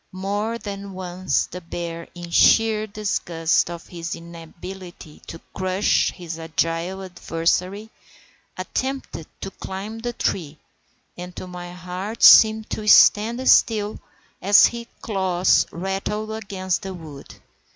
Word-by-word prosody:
More 205 +4 -2
than 200 -3 -7
once 185 -3 -1
the 180 - -9
bear, 170 0 -6
in 175 -1 -8
sheer 220 +3 +4
disgust 175 -7 0
at 170 -1 -7
his 165 -2 -6
inability 170 0 -11
to 165 - -8
crush 185 +2 +1
his 170 -2 -8
agile 165 +3 -2
adversary, 185 +4 -2 0.7
attempted 265 - -4
to 195 - -5
climb 200 +5 -7
the 240 +1 -4
tree, 160 -9 -2 0.6
and 180 0 -8
my 175 -1 -8
heart 180 +5 -6
seemed 220 0 +8
to 215 -1 -4
stand 230 +4 +5
still 215 -2 +3 0.4
as 200 +2 +7
his 235 0 -3 0.2
claws 190 -4 +2
rattled 195 +4 -3
against 195 -4 -3
the 190 -2 -6
wood. 155 -5 -11
185 Hz, 120 wpm, -22 LUFS, 170-210 Hz, 0.7 s, seemed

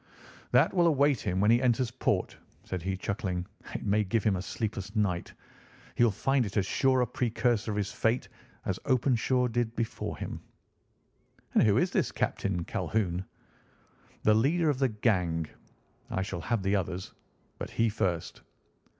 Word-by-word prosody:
"That 125 +6 +4
will 175 -2 +4
await 145 -3 +3
him 95 -3 -1
when 105 +3 +4
he 120 +1 +4
enters 125 -1 +2
port," 130 - 0 0.3
said 95 -2 -4
he, 95 +2 -2
chuckling. 95 -2 -2 0.3
"It - - -4
may 105 +1 +3
give 105 +2 0
him 105 -3 +3
a - - -3
sleepless 105 0 -4
night. 95 -5 0 0.6
He - - +3
will 120 - +6
find 135 +6 +1
it 105 -1 -4
as 100 - +2
sure 130 +5 +2
a - - +3
precursor 120 -1 0
of 105 - -2
his 100 -2 -1
fate 115 +3 0 0.4
as 95 - -1
Openshaw 125 -1 +2
did 120 -1 -1
before 115 -1 -3
him." - - -5 1.1
"And - - +5
who 105 -1 +4
is 175 +7 +2
this - - +1
Captain 90 -4 -1
Calhoun?" 95 -2 -1 1.0
"The 110 - +5
leader 150 +8 +3
of 135 - -4
the 135 -2 +3
gang. 90 -7 +1 0.6
I 95 - -1
shall 95 -3 -5
have 115 +2 -1
the 95 +1 +2
others, 90 -1 -3 0.5
but - - -4
he 115 - +1
first." 90 -6 -2
110 Hz, 165 wpm, -29 LUFS, 95-125 Hz, 1.1 s, will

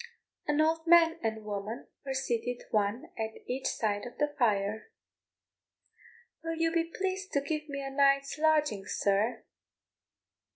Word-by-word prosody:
An 295 0 +2
old 320 +1 +1
man 330 -1 +6
and 220 -1 -2
woman 210 +2 -4 0.2
were 270 -1 -3
seated 245 -2 -2
one 210 +3 0
at 220 0 -2
each 260 +2 -2
side 210 0 -1
of 245 - -12
the 295 0 +1
fire. 210 - +1 1.5
"Will 330 0 -2
you 330 0 +1
be 330 0 +2
pleased 380 +3 -3
to 280 - +4
give 305 +1 -3
me 280 -1 -4
a 270 - -4
night's 275 +1 +3
lodging, 300 -11 +2
sir?" 205 +4 +1
275 Hz, 140 wpm, -30 LUFS, 220-315 Hz, 1.5 s, man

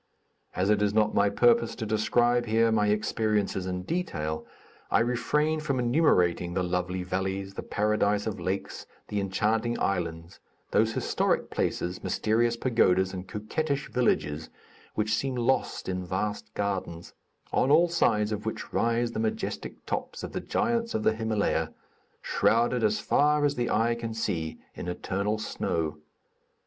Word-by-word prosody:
As 95 +3 +2
it 105 -1 +3
is 105 0 +1
not 110 -1 +3
my 100 0 +3
purpose 235 - +3
to 110 - -4
describe 120 +3 +2
here 115 +1 +3
my 105 -2 +2
experiences 105 -2 0
in 90 0 -3
detail, 80 - -3 0.4
I - - +4
refrain 150 +6 +1
from 145 -3 -1
enumerating 90 - +2
the 95 - +1
lovely 90 +1 -1
valleys, 95 +1 -2
the - - -5
paradise 105 -1 +1
of 110 -4 -3
lakes, 95 +2 -4 0.2
the 105 - -1
enchanting 110 +4 0
islands, 85 -3 -2 0.3
those 110 +1 +3
historic - - 0
places, 90 +1 -2
mysterious 115 +2 +1
pagodas, 95 -7 +2
and 95 0 -6
coquettish 140 +8 -2
villages 80 -11 0 0.5
which 105 0 0
seem 130 +4 0
lost 125 +2 0
in 90 0 -2
vast 95 +3 -3
gardens; 95 -4 -3 0.4
on 130 - +3
all 165 +4 +6
sides 110 -11 +2
of 105 -1 -3
which 110 - -5
rise 115 0 +1
the - - -4
majestic 110 0 -3
tops - - -4
of - - -5
the - - -3
giants 230 0 0
of 110 - 0
the 110 - +4
Himalaya, 110 -2 0 0.5
shrouded 120 +1 +2
as 105 -1 +2
far 150 0 +3
as 145 - +2
the 120 -3 -1
eye 115 +2 +2
can 115 -1 -5
see 80 -8 -2 0.2
in - - -7
eternal 100 +4 -1
snow. 80 -7 -2
105 Hz, 150 wpm, -28 LUFS, 95-120 Hz, 0.5 s, all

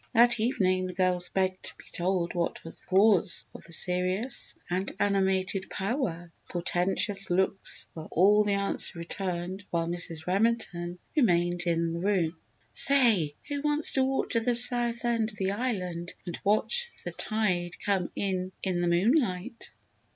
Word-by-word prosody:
That 240 0 +5
evening 185 -5 0
the 180 - -7
girls 180 -1 0
begged 185 -1 -1
to - - -9
be - - -15
told 175 -1 -1
what 175 -1 -3
was 165 - -6
the - - -10
cause 195 -1 +3
of - - -12
the 170 - -14
serious 185 +8 -2
and 185 +2 -2
animated 190 -1 0
pow 200 +6 -3
wow. 175 - -3 0.2
Portentous 190 +3 0
looks 190 +2 0
were 160 -1 -9
all 205 +5 +4
the 205 -1 0
answer 200 -2 -1
returned 180 +2 -5
while 170 -1 -1
Mrs. 170 -2 -2
Remington 185 -3 -1 0.2
remained 175 - +1
in 165 0 0
the 170 - -4
room. 180 -3 0 0.4
"Say, 225 - +6
who 285 -1 -3
wants 295 +1 0
to 265 - +1
walk 265 0 -1
to 230 - +2
the 240 +1 0
south 240 -1 +6
end 230 -2 0
of 215 - -9
the 190 0 -1
island 185 -7 -4
and 175 - -6
watch 480 - +3 0.2
the - - -4
tide 180 -6 -2
come 195 -4 0
in 185 -2 -3
in 180 -2 -1
the 175 - 0
moonlight?" 210 - 0
190 Hz, 160 wpm, -27 LUFS, 175-220 Hz, 0.4 s, Say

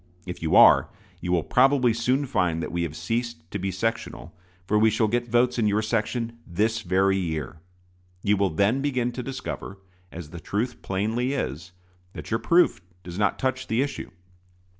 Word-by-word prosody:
If 90 -1 -7
you 80 - +1
are, - - +7 0.3
you 90 - -3
will 85 -3 +2
probably 130 -2 +3
soon 125 +5 +1
find 90 -10 0
that - - -5
we 85 - -1
have 80 -3 -3
ceased 115 0 -4
to 100 - -3
be 95 +1 -2
sectional, 115 -3 -3 0.3
for 105 +3 +2
we 110 +1 +5
shall 110 +1 +1
get 120 +2 -1
votes 120 +1 +2
in 110 - +2
your 105 +1 +1
section 115 +1 -2
this 110 +5 0
very 95 +1 +2
year. 80 -3 -4 0.6
You 105 0 +3
will 100 -1 +1
then 100 +10 +1
begin 130 -4 0
to 125 - -5
discover, 125 -6 -6 0.3
as 80 -3 -9
the 85 - -8
truth 105 +9 -3
plainly 110 +7 -1
is, 85 - -4 0.4
that - - -9
your 115 - +1
proof 170 - +3 0.2
does 90 +2 -7
not 105 -1 +1
touch 130 0 -2
the 115 +4 +1
issue. 140 -1 -5
110 Hz, 185 wpm, -25 LUFS, 90-120 Hz, 0.6 s, are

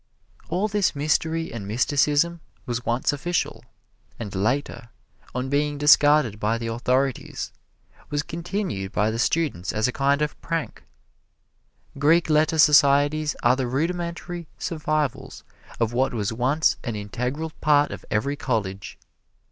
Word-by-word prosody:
All 185 +5 0
this 205 -6 0
mystery 160 +2 0
and 105 -4 -6
mysticism 145 +8 +1 0.2
was 120 -2 -3
once 120 +5 0
official, 175 +5 -2 0.6
and 105 -4 -6
later, 120 +3 -1 0.5
on 125 +1 -2
being 145 +1 0
discarded 145 -6 +5
by 110 +2 0
the 115 - -5
authorities, 125 +3 -1 0.6
was 145 0 -1
continued 170 - -4
by 105 +1 +1
the 115 - -4
students 120 - 0
as 110 +2 +1
a - - -1
kind 140 +3 +1
of 150 - -4
prank. 165 -1 -3 1.2
Greek 160 +3 +3
letter 155 +1 +3
societies 145 0 +4
are 120 +1 +5
the 130 -2 -2
rudimentary 170 +4 -3
survivals 150 -5 -2 0.4
of 115 0 0
what 130 +1 +1
was 110 0 -1
once 130 +7 +1
an 115 -4 -3
integral 125 +10 -4
part 150 -1 +3
of - - -7
every 140 +7 0
college. 100 -8 -3
140 Hz, 130 wpm, -24 LUFS, 120-155 Hz, 1.2 s, discarded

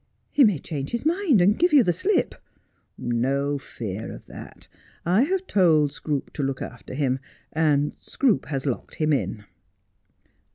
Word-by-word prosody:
' - - -45
He 285 - +5
may 210 -8 +4
change 140 -2 -5
his 235 +4 -2
mind, 325 - +3
and 205 +4 +3
give 350 -1 +3
you 280 -4 +7
the 175 - +2
slip.' 385 - +1 0.5
' - - -44
No 135 +4 0
fear 110 -5 -6
of - - -11
that. - - -12 0.4
I 180 +6 +4
have 380 +3 -1
told 160 - +3
Scroope 145 -2 -4
to - - -4
look 135 -1 -1
after - - -8
him, 135 -2 0 0.3
and 150 -2 +2
Scroope 255 -7 0
has 135 -2 -3
locked 130 -4 -3
him 155 -1 +1
in.' 110 -6 -2
150 Hz, 170 wpm, -24 LUFS, 135-220 Hz, 0.5 s, you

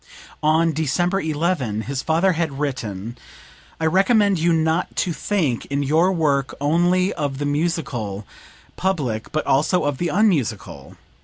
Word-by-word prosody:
[On 160 +2 +3
December 175 +6 0
11, 150 - -1
his 135 +3 -4
father 165 +6 +2
had 160 -5 -2
written: 120 -5 -4 0.6
"I 160 - -1
recommend 195 +2 +3
you 170 +2 +2
not 160 +1 0
to 175 - 0
think 160 - -1
in 140 0 -1
your 160 +6 +3
work 145 -6 0
only 175 +6 +2
of 145 -3 -3
the 145 - -3
musical 145 - -2 0.5
public, 140 -13 -2
but 155 - -1
also 155 +7 +2
of 145 -2 -1
the 175 - 0
unmusical. 115 - -1
155 Hz, 140 wpm, -21 LUFS, 135-175 Hz, 0.6 s, On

